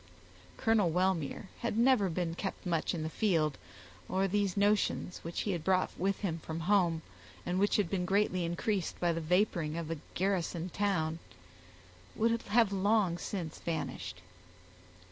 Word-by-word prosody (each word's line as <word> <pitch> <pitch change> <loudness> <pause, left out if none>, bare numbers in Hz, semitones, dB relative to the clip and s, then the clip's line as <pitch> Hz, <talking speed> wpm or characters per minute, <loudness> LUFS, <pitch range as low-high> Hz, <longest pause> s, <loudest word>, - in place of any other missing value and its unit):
Colonel 220 -5 +3
Wellmere 180 +1 0
had 235 -2 -2
never 235 -5 +4
been 170 0 -1
kept 195 +3 -5
much 170 -1 0
in 160 - -3
the - - -1
field, 160 -7 +1 0.5
or 190 +1 +1
these 200 -1 0
notions, 205 -3 +1
which 170 +1 -4
he 205 - -1
had 170 -4 -2
brought 185 +1 +2
with 195 +1 -1
him 170 -5 -1
from 160 +1 -5
home, 170 -3 +2 0.4
and 180 +1 0
which 205 +1 +3
had 205 -4 +2
been 180 0 -1
greatly 190 -2 +2
increased 185 +2 -1
by 175 -1 +2
the 165 - -2
vaporing 170 -2 +1
of 165 -1 -4
a 165 - -3 0.2
garrisoned 180 -2 -1
town, 170 -6 0 1.0
would 230 +1 +2
have 215 -1 +3
long 195 -3 +2
since 175 -4 -4
vanished. 135 - -4
180 Hz, 155 wpm, -32 LUFS, 165-200 Hz, 1.0 s, never